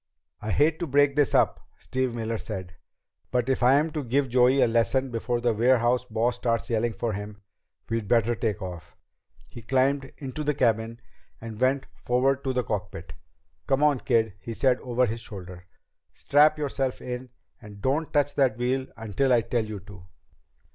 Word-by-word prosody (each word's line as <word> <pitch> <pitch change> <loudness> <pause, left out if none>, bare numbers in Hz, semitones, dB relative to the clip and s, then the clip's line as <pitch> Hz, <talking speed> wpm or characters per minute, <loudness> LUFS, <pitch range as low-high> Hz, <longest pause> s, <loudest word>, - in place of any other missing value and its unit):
"I 105 - -5
hate 155 +6 +2
to 170 - -2
break 140 0 +3
this 145 -2 +2
up," - - +3 0.2
Steve 130 -2 -2
Miller 115 -1 -3
said, 95 -4 -6 0.6
"but 125 0 0
if 135 - 0
I'm 140 +6 +4
to 150 -1 -3
give 135 +2 0
Joey 125 +2 +4
a - - +6
lesson 120 +3 +1
before 120 +1 -1
the 120 -1 +2
warehouse 120 +2 +2
boss 120 +1 0
starts 115 -1 -1
yelling 115 0 0
for 115 -1 -2
him, 105 +1 -7 0.4
we'd 115 -2 -2
better 115 +1 +3
take 105 -2 -2
off." 90 -2 -8 0.5
He 120 - -11
climbed 135 +3 +1
into 140 +2 -5
the 150 -1 0
cabin 115 -2 0 0.4
and 115 0 -8
went 130 +1 +2
forward 130 +2 0
to 135 - +1
the 125 -1 0
cockpit. 105 -4 -5 0.5
"Come 135 +2 +2
on, 145 -3 +3
kid," 110 -3 +1
he 115 +4 -7
said 130 0 +2
over 125 0 +1
his 115 0 -3
shoulder. 90 -5 -9 0.5
"Strap 150 +2 +4
yourself 135 -3 -2
in, 125 +1 -6 0.3
and 105 -1 -12
don't 145 +8 -1
touch 145 -1 +2
that 130 -6 +2
wheel 130 +2 -1
until 115 +4 0
I 120 -2 +5
tell 115 0 -1
you 105 -1 -6
to." 95 -1 -14
120 Hz, 175 wpm, -26 LUFS, 110-135 Hz, 0.6 s, a